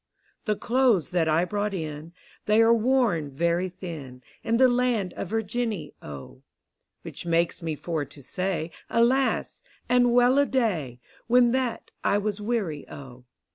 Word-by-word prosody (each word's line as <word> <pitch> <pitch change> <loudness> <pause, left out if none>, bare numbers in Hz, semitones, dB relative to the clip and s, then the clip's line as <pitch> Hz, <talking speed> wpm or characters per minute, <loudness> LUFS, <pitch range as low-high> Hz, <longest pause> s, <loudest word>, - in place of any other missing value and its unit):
The 215 - +1
cloathes 235 - +2
that 170 -3 +1
I 160 +3 +3
brought 205 +1 -2
in, 155 -1 -6 0.4
They 215 +2 +5
are. 230 +1 +5
worn 230 - +2
very 170 +6 0
thin, 150 -9 -9 0.2
In 230 +1 +1
the 260 +1 +6
land 245 -6 +1
of - - -5
Virginny, 220 -5 -2
O: 70 -2 -10 0.6
W^hich - - -7
makes 170 0 0
me 160 -2 -3
for 160 0 -3
to 140 0 -13
say 180 +1 -3 0.2
Alas! 255 +3 +1 0.3
and 245 0 +4
well 245 +3 +5
a 285 - +3
day, 175 - -1 0.3
When 240 0 +5
that 255 -2 -2
I 200 - +3
was 205 0 -2
weary, 205 -10 -2
O. 130 -2 -11
200 Hz, 150 wpm, -26 LUFS, 160-240 Hz, 0.6 s, the